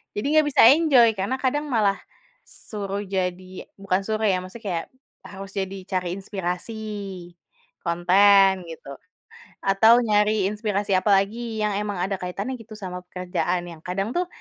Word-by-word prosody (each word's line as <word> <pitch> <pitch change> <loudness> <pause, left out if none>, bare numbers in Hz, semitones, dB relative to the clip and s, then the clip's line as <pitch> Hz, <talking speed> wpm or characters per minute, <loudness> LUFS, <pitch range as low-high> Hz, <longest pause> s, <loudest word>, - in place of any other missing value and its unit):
jadi 205 - -3
nggak 305 - +2
bisa - - +4
enjoy 275 -7 +5
karena 200 +7 -1
kadang 295 +3 0
malah 210 -6 +1 0.5
suruh 200 -1 -5
jadi 185 -1 -4
bukan 195 -1 -1
suruh 220 0 -1
ya 185 -3 +2
maksudnya 185 +6 -10
kayak 165 -1 -2 0.4
harus 195 -1 -9
jadi 195 0 -4
cari 185 -1 -1
inspirasi 190 +1 -4 1.1
konten 190 +2 +4
gitu, 160 - -12 0.8
atau 210 +4 +5
nyari 210 -2 +2
inspirasi 205 -1 -2
apalagi 215 +4 0
yang 210 - +1
emang 205 -2 -3
ada 195 +1 -1
kaitannya 195 +7 -4
gitu 225 -1 -12
sama 185 -4 -6
pekerjaan 180 -1 -2
yang 165 - -11
kadang 195 +4 -2
tuh 360 0 +1
195 Hz, 140 wpm, -24 LUFS, 185-215 Hz, 1.1 s, enjoy